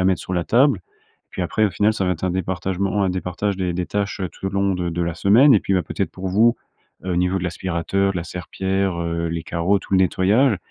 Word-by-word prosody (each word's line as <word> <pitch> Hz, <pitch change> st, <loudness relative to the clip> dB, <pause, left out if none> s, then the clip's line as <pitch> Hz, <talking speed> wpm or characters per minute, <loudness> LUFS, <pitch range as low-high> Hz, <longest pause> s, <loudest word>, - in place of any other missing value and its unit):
a -, -, +2 dB
à -, -, +1 dB
mettre 95 Hz, -1 st, +2 dB
sur 95 Hz, -, -5 dB
la 85 Hz, -1 st, 0 dB
table. 125 Hz, -4 st, +3 dB, 0.5 s
Puis 95 Hz, -, -4 dB
après 110 Hz, +5 st, +1 dB
au -, -, -2 dB
final, 105 Hz, +5 st, +2 dB
ça 95 Hz, -, -2 dB
va 90 Hz, -, +1 dB
être 85 Hz, +2 st, -5 dB
un 90 Hz, -, +1 dB
départage 95 Hz, +2 st, -1 dB
un 95 Hz, -, +1 dB
départage 95 Hz, +2 st, -2 dB
des 90 Hz, -2 st, -1 dB
des 90 Hz, +1 st, -3 dB
tâches 100 Hz, -1 st, -2 dB
tout -, -, -7 dB
au -, -, -1 dB
long 100 Hz, -1 st, +1 dB
de 90 Hz, -1 st, -2 dB
de 85 Hz, +1 st, -2 dB
la 85 Hz, -1 st, -2 dB
semaine. 115 Hz, -, +5 dB
Et 100 Hz, -, +4 dB
puis, -, -, -2 dB
bah, 90 Hz, -, +2 dB
peut-être 100 Hz, -3 st, -3 dB
pour 95 Hz, 0 st, -5 dB
vous, 115 Hz, +6 st, +3 dB, 0.5 s
heu, 95 Hz, -, -2 dB
au -, -, -1 dB
niveau 90 Hz, +2 st, +1 dB
de 90 Hz, -, -5 dB
l'aspirateur, 95 Hz, +2 st, -1 dB
de -, -, -6 dB
la 85 Hz, -, -3 dB
serpillère, 95 Hz, +1 st, -2 dB
heu, 85 Hz, 0 st, -2 dB
les 80 Hz, -1 st, -3 dB
carreaux, 85 Hz, +5 st, +1 dB
tout -, -, -11 dB
le 95 Hz, -, +5 dB
nettoyage, 100 Hz, +6 st, +3 dB
95 Hz, 265 wpm, -21 LUFS, 90-100 Hz, 0.5 s, semaine